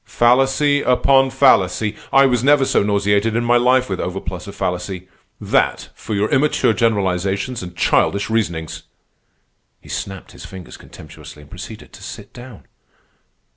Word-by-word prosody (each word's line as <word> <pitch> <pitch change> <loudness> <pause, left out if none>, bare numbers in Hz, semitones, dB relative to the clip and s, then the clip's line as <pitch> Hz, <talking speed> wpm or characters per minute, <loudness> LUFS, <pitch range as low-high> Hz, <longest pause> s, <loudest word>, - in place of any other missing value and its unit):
Fallacy 135 +4 +2
upon 135 +1 +3
fallacy! 110 -5 +2 0.2
I 135 0 +5
was 125 -2 +1
never 140 0 +4
so - - +2
nauseated 100 +2 +1
in 120 +1 0
my 120 +1 +4
life 125 +1 +2
with 95 - -4
overplus 90 0 -5
of 100 - -9
fallacy. 90 +1 -4 0.3
That - - 0
for 110 - -6
your 100 +2 +1
immature 140 -4 +2
generalizations 100 +1 -1
and 90 -1 -9
childish 100 +3 +1
reasonings!" 85 -8 -3 1.0
He - - -18
snapped 95 -2 -6
his - - -13
fingers 95 -2 -11
contemptuously 75 - -13
and 70 - -20
proceeded - - -10
to - - -14
sit - - -10
down. 120 -3 -12
105 Hz, 145 wpm, -19 LUFS, 95-125 Hz, 1.0 s, I